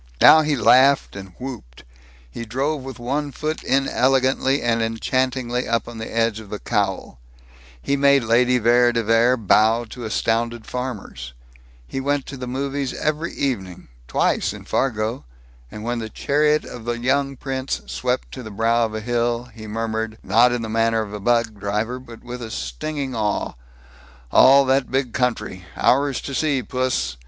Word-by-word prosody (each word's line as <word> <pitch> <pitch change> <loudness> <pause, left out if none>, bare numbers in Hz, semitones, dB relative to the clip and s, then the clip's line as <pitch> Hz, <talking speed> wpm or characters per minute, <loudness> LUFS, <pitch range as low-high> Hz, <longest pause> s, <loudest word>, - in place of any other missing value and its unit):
Now 155 - +8
he 150 -1 0
laughed 130 +3 +4
and 95 -2 -9
whooped; 120 - -8 0.4
he 90 - -7
drove 135 +6 -2
with 130 -2 -8
one 140 +4 -2
foot 155 +4 -3
inelegantly 135 0 +2
and 115 -1 +1
enchantingly 125 +2 -1
up 115 -1 0
on 120 -1 -8
the 110 - -6
edge 115 -1 0
of 110 -2 -12
the 105 - -4
cowl; 100 - -2 0.6
he 140 - -1
made 140 -1 +4
Lady 125 +3 +3
Vere 120 +1 +4
de 115 -1 0
Vere 115 +3 +3
bow 110 +2 +3
to 125 - -8
astounded 115 +1 -1
farmers; 110 - -6 0.5
he 135 - -4
went 140 0 -1
to 140 - -8
the 125 -1 -6
movies 135 +1 -3
every 155 +2 -2
evening 95 -10 -3 0.2
twice, - - +1
in - - -11
Fargo; 115 -2 -1 0.5
and 105 - -9
when 120 +1 -2
the 110 -1 -5
chariot 150 +5 +1
of 120 -2 -9
the 120 0 -2
young 135 +2 0
prince 135 0 -3
swept 125 0 -2
to 130 - -7
the 110 - -8
brow 115 +3 +1
of 110 - -8
a 110 - -3
hill, 120 +1 -1
he 110 -1 -10
murmured, 110 0 -3
not 115 +6 +4
in 120 -1 -2
the - - -4
manner 115 0 +1
of 105 -1 -9
a 105 - -5
bug 115 -1 +1
driver 105 +5 -2
but 120 -3 -13
with 125 0 -7
a 115 - -6
stinging 130 - -4
awe, 105 -3 -1 0.8
"All 135 +1 +7
that 130 0 +1
big 130 -2 -1
country! 125 -8 -2
Ours 140 +1 +2
to 140 - -6
see, 140 -2 0
puss! 125 - -1
120 Hz, 170 wpm, -22 LUFS, 110-135 Hz, 0.8 s, Now